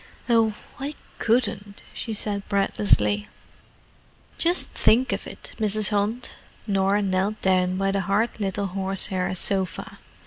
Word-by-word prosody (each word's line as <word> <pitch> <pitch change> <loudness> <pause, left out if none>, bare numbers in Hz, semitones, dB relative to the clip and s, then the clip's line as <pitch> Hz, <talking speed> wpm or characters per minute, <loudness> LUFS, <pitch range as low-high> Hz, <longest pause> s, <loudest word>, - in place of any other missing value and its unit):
"Oh—I 235 +5 0 0.2
couldn't," 210 -4 0
she 230 - -5
said 205 -2 -2
breathlessly. 205 +1 +2 1.1
"Just 345 +2 +2
think 250 +4 +3
of - - -4
it, - - -10
Mrs. 215 -1 +2
Hunt!" 210 +4 -1 0.3
Norah 195 0 +2
knelt 195 +2 0
down 185 -1 +2
by 195 0 +1
the 195 0 0
hard 205 +5 0
little 200 0 -1
horsehair 190 -1 -1
sofa. 190 0 0
200 Hz, 115 wpm, -24 LUFS, 195-215 Hz, 1.1 s, think